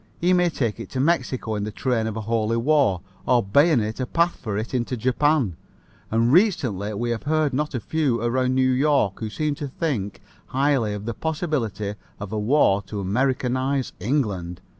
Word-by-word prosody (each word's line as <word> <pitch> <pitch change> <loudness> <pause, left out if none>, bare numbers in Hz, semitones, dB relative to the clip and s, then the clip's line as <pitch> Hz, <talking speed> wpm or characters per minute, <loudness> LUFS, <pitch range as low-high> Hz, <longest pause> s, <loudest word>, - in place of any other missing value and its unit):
He 180 +2 +3
may 180 -1 +3
take 115 -9 -2
it 115 - -7
to 130 - -2
Mexico 130 -6 0
in 105 -1 -2
the 105 - -3
train 115 +1 -1
of 110 -1 -4
a - - -3
holy 115 +1 0
war 130 - +2 0.3
or 125 -1 +4
bayonet 110 - +2
a 130 - -2
path 170 +4 +1
for 110 -5 -4
it 110 +4 -4
into 125 0 -1
Japan, 130 - +1 0.5
and 115 +3 +2
recently 125 - +2
we 120 +3 -1
have 115 - -2
heard 155 -2 +1
not 150 +1 -1
a - - 0
few 140 -2 0
around 130 +2 +1
New 130 0 +3
York 130 -7 +2
who 110 - -3
seem 150 +8 -1
to 145 0 -5
think 130 - -3 0.3
highly 130 -6 +1
of 105 0 -7
the 115 - -2
possibility 130 - -2 0.3
of 105 0 -6
a 110 - -1
war 105 -3 +3
to 105 - -5
Americanize 130 +5 0
England. 100 - -1
125 Hz, 185 wpm, -23 LUFS, 110-145 Hz, 0.5 s, or